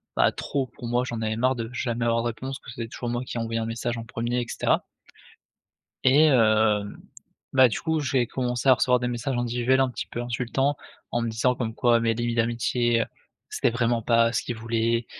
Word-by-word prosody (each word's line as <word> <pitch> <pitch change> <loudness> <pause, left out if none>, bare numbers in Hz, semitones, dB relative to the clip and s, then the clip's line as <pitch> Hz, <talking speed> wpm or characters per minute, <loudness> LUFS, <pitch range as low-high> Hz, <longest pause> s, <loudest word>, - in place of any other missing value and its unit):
bah, - - +4
trop 135 -2 -2
pour 120 0 -9
moi. 120 +1 +1
J'en 120 -3 -4
avais 110 0 -1
marre 130 +3 +1
de 115 -2 -4
jamais 120 -1 -2
avoir 115 0 +1
de - - 0
réponse, 130 +4 -6
que 115 - -11
c'était 115 0 -5
toujours 120 +1 -5
moi 120 +1 -2
qui 120 - -6
envoyais 115 0 -2
un 110 - -2
message 120 +1 -3
en 115 - -6
1er 120 +2 -2
et 120 - -4
cetera - - +1 1.2
et 145 +4 +6
hem, 110 -5 +2 0.5
bah, 130 -1 +6
du 110 - -3
coup, 160 -1 0
j'ai 130 -3 +1
commencé 125 +1 -2
à 130 - +9
recevoir 125 0 +3
des 125 - -1
messages 120 +2 -2
individuels 120 +2 +1
un 135 - +3
petit - - -5
peu 120 - -5
insultants 125 +4 -1 0.4
en 120 - 0
me 115 - -1
disant 115 +3 +1
comme 115 -3 -3
quoi 120 -1 +3
mes 115 0 +1
limites 120 +1 -2
d'amitié, 120 0 +1 0.5
c'était - - +1
vraiment 120 0 0
pas 115 0 +3
ce - - 0
qu'ils 120 - -5
voulaient, 115 +1 0
120 Hz, 215 wpm, -25 LUFS, 115-125 Hz, 1.2 s, à